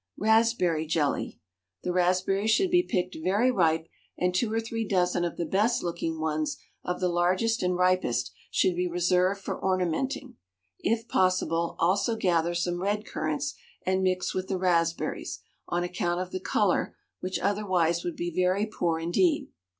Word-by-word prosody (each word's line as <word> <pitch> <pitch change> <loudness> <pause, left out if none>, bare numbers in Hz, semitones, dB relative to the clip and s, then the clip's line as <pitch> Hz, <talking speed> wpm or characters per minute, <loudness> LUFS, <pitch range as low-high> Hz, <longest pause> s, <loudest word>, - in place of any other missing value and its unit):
RASPBERRY 220 -8 +2
JELLY. 150 -3 -1 0.4
The 180 - -1
raspberries 185 +3 +2
should 350 - +3
be 355 0 +5
picked 185 - -2
very 205 +8 +3
ripe, 165 -6 +2 0.3
and 180 0 +1
two 215 +4 +1
or 225 - +1
three 225 0 -3
dozen 180 -4 +1
of 170 - -3
the 170 - -1
best 210 +8 +1
looking 165 -2 -3
ones 155 -1 -1 0.3
of 180 - -3
the 185 - +1
largest 185 +6 +1
and 180 0 +1
ripest 180 -10 +1 0.2
should 185 - +2
be 180 +1 0
reserved 180 +3 +1
for - - -5
ornamenting. 185 - -1 0.4
If 230 +1 0
possible, 180 -4 +1
also 200 +7 +2
gather 175 -4 +1
some 175 0 -1
red 205 +2 -1
currants - - -2 0.3
and 190 0 +1
mix 185 -1 0
with 185 0 -3
the 190 - -1
raspberries, 170 -2 0 0.3
on 175 0 -1
account 175 0 -1
of 185 0 -4
the 185 - -3
colour, 190 0 +1 0.2
which 185 +1 -2
otherwise 185 -5 +1
would 175 - -3
be 175 -1 -3
very 185 +3 +2
poor 175 -6 -1
indeed. 175 - +1
180 Hz, 160 wpm, -27 LUFS, 175-200 Hz, 0.4 s, be